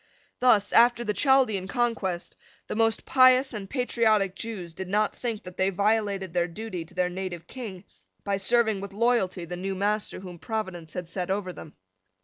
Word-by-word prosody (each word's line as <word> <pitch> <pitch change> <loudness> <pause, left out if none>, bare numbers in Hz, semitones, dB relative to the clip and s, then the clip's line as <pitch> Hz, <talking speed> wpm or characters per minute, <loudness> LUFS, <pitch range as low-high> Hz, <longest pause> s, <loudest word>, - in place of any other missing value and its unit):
Thus, 220 -5 +4
after 240 0 +5
the 210 -2 -1
Chaldean 250 -8 +3
conquest, 210 -7 -1 0.3
the - - -5
most 225 0 +1
pious 255 0 +5
and 200 -3 -6
patriotic 220 -7 +1
Jews 190 -6 -6
did 190 +3 -6
not 210 +3 +1
think 230 -4 -4
that 180 -1 -10
they 190 +1 +2
violated 200 -2 0
their 175 -1 +1
duty 180 0 -6
to - - -18
their 180 0 +2
native 180 -2 -5
King 215 -8 -8 0.4
by 200 -1 0
serving 220 0 +2
with 200 0 -7
loyalty 205 -5 +1
the 175 +1 -6
new 190 +1 -3
master 205 +2 -1
whom 180 -3 -9
Providence 185 -8 -4
had 180 -2 -5
set 180 +1 -4
over 190 -2 -2
them. 155 - -11
200 Hz, 175 wpm, -27 LUFS, 185-225 Hz, 0.4 s, after